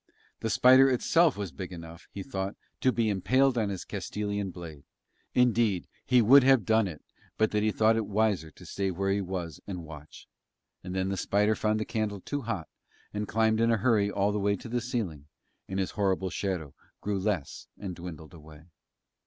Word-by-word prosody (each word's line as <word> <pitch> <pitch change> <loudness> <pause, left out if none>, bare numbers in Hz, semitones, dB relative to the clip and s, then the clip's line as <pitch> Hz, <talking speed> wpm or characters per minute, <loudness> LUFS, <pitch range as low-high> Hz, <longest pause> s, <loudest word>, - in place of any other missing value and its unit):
The 110 - -2
spider 130 +4 +6
itself 155 +3 +3
was 100 -4 -4
big 95 +1 -7
enough, 85 0 -10
he 100 - -7
thought, 95 -7 -4 0.2
to 130 - +3
be 115 -2 0
impaled 130 +7 +2
on 110 -4 0
his 95 -3 -5
Castilian 100 -1 -3
blade; 80 -5 -9 0.5
indeed, 115 -7 +3 0.2
he 125 -2 +5
would 135 +6 +8
have 130 -3 +5
done 110 -2 +3
it 80 -5 -8 0.3
but 110 -1 +2
that 105 - +1
he 110 0 +2
thought 110 +1 +3
it 110 -2 -1
wiser 105 -5 +1
to - - -16
stay 100 -1 -2
where 95 +2 -1
he 100 +1 +1
was 90 -5 -5
and 90 -4 -5
watch. 75 -1 -12 0.6
And 90 +1 -6
then 95 0 0
the 100 - -2
spider 105 +3 +2
found 110 0 0
the 110 - -2
candle 110 -3 -2
too 145 +9 -4
hot 110 -9 -4 0.5
and 105 0 -3
climbed 110 0 +2
in 115 - +3
a 115 - +3
hurry 105 -2 +2
all 100 0 +1
the 105 - -1
way 100 0 +1
to 100 - -10
the 120 +1 -1
ceiling, 100 - -4 0.4
and 95 - -3
his 95 -1 -1
horrible 95 -2 0
shadow 90 -8 -3 0.3
grew 100 -1 -1
less 95 -7 -3
and 95 -3 -6
dwindled 85 -1 -9
away. 75 -1 -14
100 Hz, 195 wpm, -29 LUFS, 90-110 Hz, 0.6 s, would